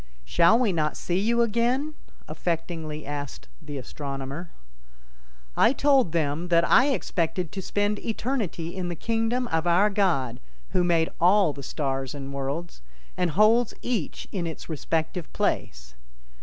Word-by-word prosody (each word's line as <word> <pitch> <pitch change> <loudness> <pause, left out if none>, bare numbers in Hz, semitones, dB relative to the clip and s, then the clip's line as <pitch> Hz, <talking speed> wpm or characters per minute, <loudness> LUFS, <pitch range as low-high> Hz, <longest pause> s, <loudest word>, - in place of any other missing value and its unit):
"Shall 170 - +5
we 235 -6 +2
not 155 -2 0
see 175 +1 -1
you 235 +3 +3
again?" 240 +7 0 0.3
affectingly 160 -2 -3
asked 145 -1 -6
the 150 -2 -7
astronomer. 140 +4 -6 1.1
I 240 - +5
told 275 - +3
them 160 +1 0
that 170 -1 +4
I 265 - +6
expected 180 - -1
to 195 - -5
spend 205 +2 0
eternity 215 -8 -3
in 185 -2 -3
the 175 - -3
kingdom 230 +6 0
of 160 +1 0
our 190 +5 +4
God 135 - +1 0.3
who 180 - +2
made 165 -2 +2
all 185 -2 +5
the 140 - -8
stars 135 -1 -3
and 140 -1 -6
worlds, 140 - -4 0.3
and 180 -1 +1
holds 215 +7 +4
each 230 -10 -2
in 180 -4 -2
its 160 - -7
respective 160 +2 -2
place. - - -2
170 Hz, 140 wpm, -26 LUFS, 150-210 Hz, 1.1 s, I